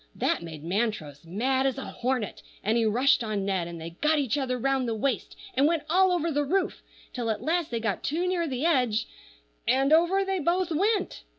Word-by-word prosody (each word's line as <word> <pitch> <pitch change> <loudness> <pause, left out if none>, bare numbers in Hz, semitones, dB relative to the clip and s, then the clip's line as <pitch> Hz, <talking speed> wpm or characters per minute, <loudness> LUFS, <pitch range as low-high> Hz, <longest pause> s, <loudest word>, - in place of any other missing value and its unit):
That - - 0
made 160 -3 -8
Montrose 175 - -2
mad 260 +10 +1
as 270 - -1
a 270 - -5
hornet, 250 -4 -2 0.2
and 220 +3 +1
he 230 -1 +2
rushed 245 +3 +3
on 210 -3 -2
Ned, 190 -4 -1
and 170 -1 -7
they 165 +1 -7
got 305 +1 +3
each 275 -5 0
other 260 -3 -1
round 265 0 0
the 225 - -1
waist, 265 +5 -2 0.2
and 285 -4 +4
went 325 -2 +1
all 375 +1 +5
over 335 -2 0
the 290 0 +1
roof, 375 +7 0 0.3
till 240 -3 -2
at 220 - -2
last 335 0 0
they 235 - -2
got 220 -4 -2
too 340 +5 -1
near 350 -2 0
the 265 +1 -2
edge, 250 -9 +2 0.6
and 270 +3 +3
over 350 +4 +4
they 385 -1 -1
both 345 +3 +1
went. 395 +5 0
265 Hz, 210 wpm, -27 LUFS, 220-330 Hz, 0.6 s, all